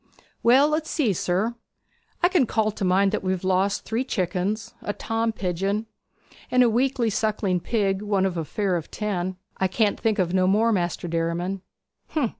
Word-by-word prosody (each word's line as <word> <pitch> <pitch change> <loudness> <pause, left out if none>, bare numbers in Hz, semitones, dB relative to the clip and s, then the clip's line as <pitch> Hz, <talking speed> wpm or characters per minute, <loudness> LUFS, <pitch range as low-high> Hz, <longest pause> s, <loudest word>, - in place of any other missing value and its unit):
'Well, 260 +5 +6
let's 310 +1 -1
see, 250 -10 +1
sir. 185 +6 0 0.7
I - - +8
can 350 -9 +2
call 215 -1 +1
to 205 - -6
mind 190 +2 +3
that 215 - -1
we've 185 -1 -1
lost 190 +2 +1
three 230 +3 -1
chickens, 195 -1 -2
a 205 - -3
tom 225 +1 -1
pigeon, 195 +2 -2 0.6
and 255 0 +5
a 240 - +4
weakly 245 -1 +1
sucking 205 -3 0
pig, 195 -1 0
one 200 -2 +1
of 190 -2 -1
a 165 - -1
fare 190 +3 -1
of 160 - -7
ten. 185 -3 -3 0.2
I 190 - +2
can't 205 +2 +1
think 220 -2 +1
of 180 -2 0
no 185 -1 +3
more, 215 +4 +3
Maister 175 -3 -1
Derriman.' 170 +3 -2
200 Hz, 175 wpm, -24 LUFS, 185-225 Hz, 0.7 s, I